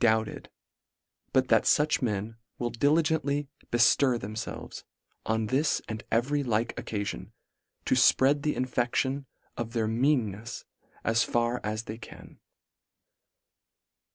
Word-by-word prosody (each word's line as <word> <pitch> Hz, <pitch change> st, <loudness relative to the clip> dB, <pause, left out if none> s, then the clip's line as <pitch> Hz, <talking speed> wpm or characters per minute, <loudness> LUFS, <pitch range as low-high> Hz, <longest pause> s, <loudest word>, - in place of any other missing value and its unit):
doubted 110 Hz, -2 st, +1 dB, 0.8 s
but 130 Hz, -1 st, +2 dB
that 115 Hz, -1 st, +4 dB
fuch 150 Hz, 0 st, +3 dB
men 110 Hz, -2 st, -2 dB, 0.2 s
will 120 Hz, -1 st, -2 dB
diligently 145 Hz, +2 st, +1 dB, 0.2 s
beftir 120 Hz, +2 st, +4 dB
themfelves, 110 Hz, +1 st, -6 dB, 0.4 s
on 110 Hz, 0 st, +1 dB
this 135 Hz, +7 st, +1 dB
and 110 Hz, 0 st, -5 dB
every 135 Hz, +6 st, +1 dB
like 115 Hz, -3 st, 0 dB
oc -, -, -7 dB
calion, 100 Hz, -, -4 dB, 0.5 s
to -, -, +2 dB
fpread 140 Hz, +2 st, +4 dB
the 150 Hz, +1 st, 0 dB
infection 130 Hz, +2 st, -1 dB, 0.3 s
of 115 Hz, 0 st, -4 dB
their 115 Hz, -2 st, 0 dB
mean 120 Hz, -1 st, +2 dB
nefs 110 Hz, +5 st, -8 dB, 0.4 s
as 115 Hz, +1 st, +2 dB
far 120 Hz, +1 st, 0 dB
as 110 Hz, +1 st, -2 dB
they 110 Hz, 0 st, -7 dB
can. -, -, -13 dB
120 Hz, 125 wpm, -28 LUFS, 110-135 Hz, 0.8 s, that